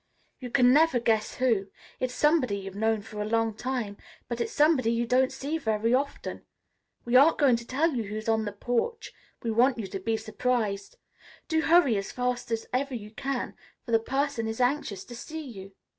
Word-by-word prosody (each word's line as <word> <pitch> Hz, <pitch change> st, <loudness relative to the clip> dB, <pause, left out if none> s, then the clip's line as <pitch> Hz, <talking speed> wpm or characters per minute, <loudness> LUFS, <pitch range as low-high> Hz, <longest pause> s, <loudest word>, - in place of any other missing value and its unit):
"You 250 Hz, -, -6 dB
can 250 Hz, 0 st, +5 dB
never 310 Hz, -3 st, +4 dB
guess 220 Hz, -2 st, +1 dB
who. 230 Hz, -6 st, +1 dB, 0.3 s
It's 255 Hz, -1 st, -2 dB
somebody 295 Hz, -9 st, +2 dB
you've 195 Hz, -1 st, -7 dB
known 220 Hz, +1 st, 0 dB
for 210 Hz, -1 st, -7 dB
a -, -, -1 dB
long 225 Hz, 0 st, +1 dB
time, 235 Hz, -3 st, -3 dB, 0.3 s
but 235 Hz, 0 st, -3 dB
it's -, -, -2 dB
somebody 295 Hz, -6 st, +3 dB
you 235 Hz, +1 st, 0 dB
don't 255 Hz, +2 st, +3 dB
see 280 Hz, +4 st, -3 dB
very 220 Hz, -2 st, 0 dB
often. 280 Hz, +2 st, -2 dB, 0.6 s
We 240 Hz, +1 st, 0 dB
aren't 285 Hz, +5 st, +7 dB
going 275 Hz, -5 st, +5 dB
to 235 Hz, 0 st, -10 dB
tell 310 Hz, +6 st, +1 dB
you 235 Hz, -4 st, -2 dB
who's 215 Hz, +2 st, -6 dB
on 220 Hz, -1 st, +2 dB
the 205 Hz, -, -3 dB
porch. 245 Hz, -, -2 dB, 0.3 s
We 230 Hz, -, -1 dB
want 245 Hz, +4 st, +3 dB
you 220 Hz, -, -3 dB
to 195 Hz, 0 st, -5 dB
be 225 Hz, +4 st, -1 dB
surprised. 215 Hz, -4 st, -2 dB, 0.5 s
Do 320 Hz, -1 st, +1 dB
hurry 320 Hz, -9 st, +4 dB
as 195 Hz, -, -4 dB
fast 250 Hz, -1 st, -2 dB
as 225 Hz, -1 st, -2 dB
ever 265 Hz, +1 st, 0 dB
you 210 Hz, -2 st, -7 dB
can, 270 Hz, +3 st, -3 dB, 0.3 s
for 235 Hz, -, -6 dB
the 225 Hz, -, +5 dB
person 270 Hz, -1 st, -1 dB
is 225 Hz, +2 st, -4 dB
anxious 245 Hz, -7 st, 0 dB
to 240 Hz, -, -10 dB
see 315 Hz, +5 st, -7 dB
you." 195 Hz, -6 st, -10 dB
240 Hz, 200 wpm, -28 LUFS, 220-270 Hz, 0.6 s, aren't